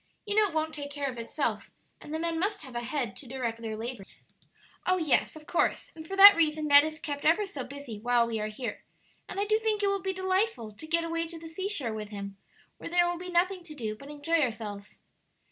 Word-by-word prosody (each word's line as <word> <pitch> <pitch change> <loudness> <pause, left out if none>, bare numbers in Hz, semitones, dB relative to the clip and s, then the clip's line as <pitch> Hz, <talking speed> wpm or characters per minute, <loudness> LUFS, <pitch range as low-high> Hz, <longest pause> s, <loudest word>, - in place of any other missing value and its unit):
You 410 - -2
know 425 0 +5
it 350 - -9
won't 315 0 0
take 290 -1 -5
care 285 -1 -3
of 240 - -9
itself, 230 - -2 0.3
and - - -10
the 315 - -1
men 330 0 -1
must 400 +1 -1
have 260 -3 -10
a 240 - -1
head 245 -4 -2
to 270 - -11
direct 235 -3 -3
their 220 -1 -4
labors." 230 -3 -6 0.8
"Oh 370 0 +4
yes, 320 -4 +2
of 310 -1 -12
course; 345 - 0
and 320 0 -9
for 390 - -4
that 400 +1 +12
reason 310 -2 +1
Ned 285 -1 +8
is 310 0 -3
kept 290 -3 -5
ever 335 +7 +4
so 290 -9 -6
busy 265 -5 -8
while 240 +1 +3
we 230 -1 -2
are 215 - -2
here, 225 +3 -5 0.5
and - - -4
I 405 - +1
do 430 +1 +2
think 435 -2 0
it - - +4
will 395 -1 0
be 380 +1 -1
delightful 375 - 0
to 260 +10 -11
get 335 +1 +2
away 330 0 -2
to 330 0 -9
the 325 0 -9
seashore 325 - -3
with 215 -1 -5
him, 200 -1 -6 0.4
where - - -6
there 350 0 +4
will 350 -1 -2
be 360 0 -7
nothing 360 +1 +1
to 310 -3 -11
do 220 -6 -3
but 275 +6 -12
enjoy 295 +3 0
ourselves." 215 -5 -4
310 Hz, 245 wpm, -29 LUFS, 240-355 Hz, 0.8 s, that